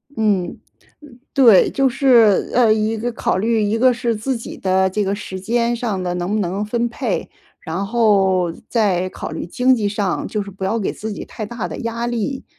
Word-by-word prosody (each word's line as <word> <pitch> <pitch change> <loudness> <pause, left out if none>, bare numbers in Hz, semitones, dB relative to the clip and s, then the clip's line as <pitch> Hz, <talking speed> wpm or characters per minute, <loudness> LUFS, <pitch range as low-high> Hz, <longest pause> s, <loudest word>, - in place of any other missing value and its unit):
嗯， 205 -6 0 0.6
呃， 240 - -17 0.2
对。 235 -8 +6
就 270 -1 +2
是， 240 -6 +4
呃， 235 -3 +5
一 220 +1 0
个 235 +2 -3
考 - - -1
虑， 220 +2 +1
一 205 +2 0
个 255 +1 +5
是 235 -2 -1
自 255 +4 -2
己 230 - -8
的 190 0 +1
这 205 +2 -1
个 195 - -1
时 190 -2 -7
间 235 +4 0
上 215 -6 -2
的 180 -1 -2
能 180 +2 -3
不 215 - +1
能 195 +2 -2
分 235 +3 -1
配， 235 - -3 0.3
然 185 +5 -4
后 195 -6 +2 0.2
再 190 -6 +1
考 - - -7
虑 160 - -5
经 250 +8 +2
济 210 -4 -1
上， 200 -3 -2
就 210 -2 -2
是 200 - -9
不 195 0 -7
要 220 +4 0
给 200 - -2
自 215 0 -6
己 - - -6
太 215 - -7
大 210 -4 -5
的 - - -7
压 230 +1 -3
力。 240 +3 -3
215 Hz, 225 characters per minute, -19 LUFS, 190-235 Hz, 0.6 s, 对